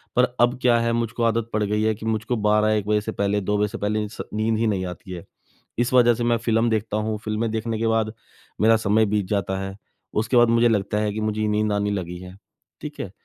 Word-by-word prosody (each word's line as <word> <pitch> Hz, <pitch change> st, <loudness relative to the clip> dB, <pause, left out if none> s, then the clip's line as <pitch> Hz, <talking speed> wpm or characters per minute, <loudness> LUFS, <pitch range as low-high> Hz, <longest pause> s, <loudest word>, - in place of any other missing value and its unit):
पर 125 Hz, -, +5 dB, 0.2 s
अब 120 Hz, +1 st, +3 dB
क्या 120 Hz, -2 st, +4 dB
है 115 Hz, 0 st, 0 dB
मुझको 115 Hz, 0 st, -2 dB
आदत 115 Hz, 0 st, +1 dB
पड़ 110 Hz, 0 st, +1 dB
गई 105 Hz, +1 st, 0 dB
है 110 Hz, 0 st, +2 dB
कि 110 Hz, -, -9 dB
मुझको 110 Hz, +2 st, -1 dB
12-1 105 Hz, 0 st, +2 dB
बजे 105 Hz, 0 st, +2 dB
से 110 Hz, -, -4 dB
पहले, 100 Hz, 0 st, 0 dB
2 105 Hz, +2 st, 0 dB
बजे 105 Hz, 0 st, +1 dB
से 105 Hz, -, -7 dB
पहले 105 Hz, +1 st, -1 dB
इन्स 105 Hz, +1 st, -6 dB
नींद 110 Hz, +1 st, 0 dB
ही 115 Hz, -, +1 dB
नहीं 95 Hz, -3 st, -1 dB
आती 90 Hz, +1 st, -8 dB
है, 90 Hz, -2 st, -7 dB, 0.5 s
इस 120 Hz, +1 st, 0 dB
वजह 120 Hz, -1 st, +5 dB
से 120 Hz, +1 st, -3 dB
मैं 120 Hz, 0 st, +2 dB
फ़िल्म 115 Hz, 0 st, +1 dB
देखता 110 Hz, -1 st, -1 dB
हूँ, 110 Hz, 0 st, -1 dB
फ़िल्में 110 Hz, +1 st, -1 dB
देखने 110 Hz, 0 st, -2 dB
के 115 Hz, -, 0 dB
बाद 110 Hz, -1 st, +1 dB, 0.5 s
मेरा 115 Hz, +2 st, +5 dB
समय 110 Hz, 0 st, +2 dB
बीत 105 Hz, -1 st, 0 dB
जाता 95 Hz, -2 st, -1 dB
है। 95 Hz, 0 st, -6 dB, 0.5 s
उसके 115 Hz, +3 st, -1 dB
बाद 120 Hz, -1 st, +6 dB
मुझे 115 Hz, +1 st, +4 dB
लगता 105 Hz, -2 st, 0 dB
है 105 Hz, -1 st, 0 dB
कि 110 Hz, -, -4 dB
मुझे 110 Hz, 0 st, -1 dB
नींद 105 Hz, 0 st, +1 dB
आने 105 Hz, 0 st, 0 dB
लगी 90 Hz, -3 st, -4 dB
है, 90 Hz, +1 st, -11 dB, 0.4 s
ठीक -, -, -8 dB
है? -, -, -4 dB
110 Hz, 245 wpm, -23 LUFS, 105-115 Hz, 0.5 s, बाद